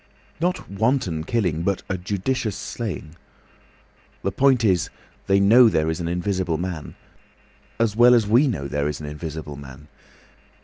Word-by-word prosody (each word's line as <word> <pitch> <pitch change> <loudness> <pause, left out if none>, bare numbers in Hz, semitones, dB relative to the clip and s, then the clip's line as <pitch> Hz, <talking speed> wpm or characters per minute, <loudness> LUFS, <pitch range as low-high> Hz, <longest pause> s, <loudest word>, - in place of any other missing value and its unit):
"Not 180 +2 -1
wanton 100 - 0
killing, 90 -9 0
but 100 +2 -1
a 95 - -2
judicious 100 +4 -2
slaying. 100 -6 -6 1.1
The - - 0
point 130 -4 +3
is, 95 -4 +2 0.4
they 95 0 +4
know 115 +5 +7
there 80 -4 +1
is 80 - -4
an 85 - -3
Invisible 90 -1 -1
Man—as 95 +5 -6
well 120 +2 +7
as 115 -3 +3
we 120 +8 +4
know 80 - -2
there 70 +1 -1
is 75 - -5
an 75 - -7
Invisible 75 0 -6
Man. 70 +1 -12
95 Hz, 145 wpm, -23 LUFS, 80-115 Hz, 1.1 s, know